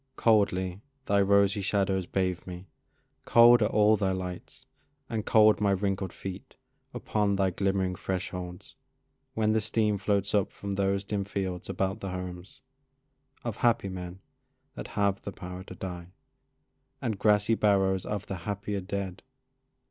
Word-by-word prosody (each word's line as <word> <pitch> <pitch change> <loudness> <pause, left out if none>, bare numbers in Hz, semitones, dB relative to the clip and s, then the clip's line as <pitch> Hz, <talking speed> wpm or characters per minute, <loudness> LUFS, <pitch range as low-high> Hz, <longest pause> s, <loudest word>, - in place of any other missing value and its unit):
Coldly 95 -4 +2 0.2
thy 100 0 +3
rosy 100 0 +3
shadows 95 -2 0
bathe 95 -2 -1
me, 90 +1 -7 0.6
cold 120 +1 +7
Are 105 - +4
all 105 0 +4
thy 95 -2 0
lights, 90 -1 -6 0.4
and 110 -2 -4
cold 110 -1 +5
my 100 - +3
wrinkled 95 -1 0
feet 95 -1 -8 0.4
Upon 105 -2 0
thy 95 -1 +1
glimmering 95 0 0
thresholds, 90 -1 -5 0.6
when 110 -1 +2
the 110 - +2
steam 105 -1 +1
Floats 100 -1 0
up 100 -3 +2
from 100 0 -5
those 100 0 0
dim 100 0 -2
fields 95 -3 -4
about 95 +2 -1
the 100 - -5
homes 90 0 -7 0.8
Of 115 -4 -4
happy 115 -5 +2
men 90 0 -7 0.5
that - - -7
have 100 -1 +1
the 100 - -6
power 90 0 -8
to - - -10
die, 90 -2 -6 0.9
And 110 -4 -3
grassy 105 +1 +3
barrows 95 -3 +2
of 105 0 -4
the 95 - -5
happier 100 +3 -4
dead. 95 -1 -4
100 Hz, 145 wpm, -28 LUFS, 95-105 Hz, 0.9 s, cold